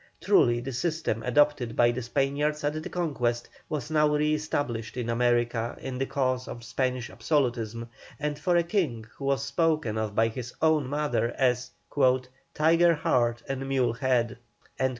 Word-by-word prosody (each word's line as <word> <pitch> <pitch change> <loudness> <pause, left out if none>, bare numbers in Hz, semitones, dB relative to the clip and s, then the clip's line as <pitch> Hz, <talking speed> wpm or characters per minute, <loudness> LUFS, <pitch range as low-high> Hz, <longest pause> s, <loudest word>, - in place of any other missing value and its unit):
Truly 120 0 +4
the 135 +2 -5
system 155 -4 -1
adopted 125 -2 +2
by 120 0 +4
the 125 +1 -4
Spaniards 140 +5 0
at 150 +2 -1
the - - -6
conquest 125 -9 -1 0.2
was 150 -2 -4
now 150 -1 +4
re 150 +1 +2
established 145 -7 -2
in 120 -1 -2
America 120 -1 +1
in 130 -1 -5
the 135 - 0
cause 130 -2 -1
of 120 - -7
Spanish 125 +1 -2
absolutism, 120 -6 -1 0.3
and 150 -1 -2
for 175 +4 +1
a 170 - +4
King 160 - -1
who 140 - -6
was 135 0 +1
spoken 145 -6 0
of 110 -2 -3
by 115 +1 +3
his 120 +1 -7
own 155 -4 +3
mother 145 -4 0
as 125 -1 +1 0.9
"tiger 165 +2 +4
heart 120 -5 +1
and 135 0 -3
mule 130 -4 +2
head." 125 -1 0
130 Hz, 160 wpm, -27 LUFS, 120-150 Hz, 0.9 s, Truly